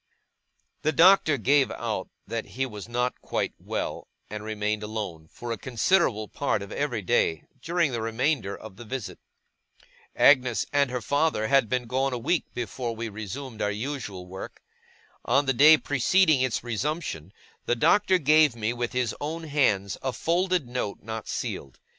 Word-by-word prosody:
The 155 - +1
Doctor 165 -1 +5
gave 135 +4 +3
out - - -4 0.2
that 115 +1 -4
he 135 - +1
was 105 -3 -8
not 125 +1 -1
quite - - -2
well; - - -4 0.2
and 105 0 -5
remained 105 0 -2
alone, 105 -7 -5
for 120 -1 -7
a 115 - -3
considerable 120 - +1
part 125 -6 -1
of 100 - -10
every 125 -8 -2
day, 90 -7 +1 0.2
during 170 -2 +1
the 120 -2 -2
remainder 115 -2 -1
of 105 -3 -12
the - - -9
visit. 120 -1 -6 1.0
Agnes 130 -4 +4
and 140 -1 +3
her 125 -1 -3
father 145 -7 +1
had 135 -5 +4
been 125 -1 0
gone 130 +3 0
a - - -1
week, 145 +8 0
before 120 -1 -3
we 115 0 -4
resumed 110 +4 -7
our 105 - +1
usual 105 -4 -5
work. 95 +1 -9 0.6
On 140 +1 +2
the 135 - +2
day 150 +5 +8
preceding 150 +2 +3
its 130 -4 0
resumption, 120 - -3 0.4
the 120 - +2
Doctor 190 - +4
gave 155 -4 +4
me 115 0 -1
with 120 -1 -3
his 125 -2 0
own 160 +3 -4
hands 120 -10 +1
a 130 - -1
folded 175 -2 0
note 120 -4 -4
not 110 0 -6
sealed. 65 - -4
125 Hz, 165 wpm, -26 LUFS, 110-145 Hz, 1.0 s, day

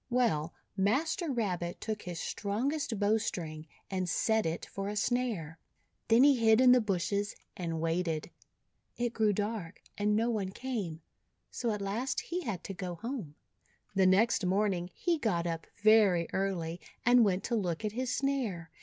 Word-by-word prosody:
Well, 220 -11 +1 0.2
Master 295 - +1
Rabbit 180 -8 -2
took 215 -1 -3
his 175 -2 -6
strongest 230 +3 -2
bow 210 +2 +3
string, 160 -7 -4 0.2
and 185 -2 -1
set 220 +2 +2
it 165 +1 -3
for 195 0 -5
a 210 - -4
snare. 210 -9 -1 0.5
Then 230 +3 +6
he 280 -2 +6
hid 220 -1 +5
in 255 -1 +7
the 250 0 +6
bushes 200 0 -1 0.2
and 165 -4 -3
waited. 165 0 -1 0.7
It 240 -1 -1
grew 220 -2 +3
dark 205 -3 -3 0.2
and 210 0 +2
no 230 +2 +2
one 205 -4 -1
came, 205 -12 -4 0.5
so 240 - -2
at 210 -1 -3
last 235 +7 -1
he 355 +2 -3
had 215 - -4
to 195 - -5
go 180 -1 -5
home. 225 - -5 0.6
The 190 -1 +4
next 210 +4 +4
morning 185 -1 +1
he 340 -3 0
got 175 -10 0
up 165 -1 -3 0.2
very 205 -6 +5
early, 180 -3 -2 0.2
and 245 0 +7
went 195 -3 +1
to 235 - -1
look 185 -2 -1
at 210 - -1
his 250 +3 -2
snare. 230 -13 -1
205 Hz, 165 wpm, -31 LUFS, 175-235 Hz, 0.7 s, in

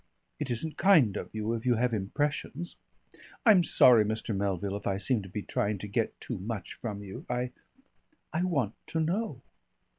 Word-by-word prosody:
It 150 -3 -3
isn't 150 +7 -3
kind 155 - +5
of - - -4
you, 110 +1 -2
if 115 -1 -3
you 125 -1 +3
have 120 +1 +1
impressions 145 - -2 0.7
I'm 205 -6 +7
sorry, 120 -8 +6
Mr. 110 +1 -2
Melville, 100 0 -1
if 100 - -5
I 95 -1 +1
seem 110 +3 +1
to 95 - -10
be 100 +2 -4
trying 105 0 -1
to 105 - -6
get 110 +2 -1
too 120 -6 -5
much 100 -1 -5
from 105 -3 -5
you. 95 -1 -8
I 125 0 -1 0.8
I 160 - +1
want 140 - 0
to 165 - -2
know." 170 - -1
115 Hz, 180 wpm, -29 LUFS, 100-145 Hz, 0.8 s, I'm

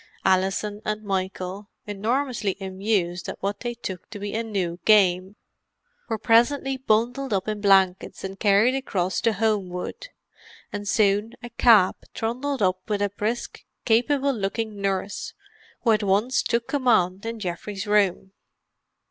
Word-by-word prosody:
Alison 195 +2 +1
and 215 0 -3
Michael, 190 0 -3 0.2
enormously 225 0 -1
amused 190 -2 -1
at - - -6
what 200 +1 -3
they 240 -1 -4
took 190 -6 -7
to 210 - -8
be 205 0 -5
a 225 - 0
new 190 -6 -3
game, 190 -2 +4 0.7
were 225 - -1
presently 245 +5 +3
bundled 250 +2 0
up 195 0 -1
in 210 -1 -3
blankets 190 -2 +2
and 195 0 -6
carried 210 +4 +4
across 190 -9 -1
to 230 -1 +2
Homewood; 210 - -2 0.7
and 205 0 -5
soon 205 +1 +2
a 240 - -8
cab 220 -5 +5 0.2
trundled 250 +3 -2
up 185 0 +1
with 205 -1 0
a 200 - 0
brisk, 215 +4 -4 0.2
capable 270 +4 +2
looking 210 -1 -3
nurse, 195 0 -2 0.5
who 230 - +4
at 215 -1 +3
once 205 +6 +2
took 235 -1 -1
command 220 -9 +2
in 230 0 -5
Geoffrey's 195 +2 -5
room. 200 -2 +1
210 Hz, 140 wpm, -24 LUFS, 195-230 Hz, 0.7 s, cab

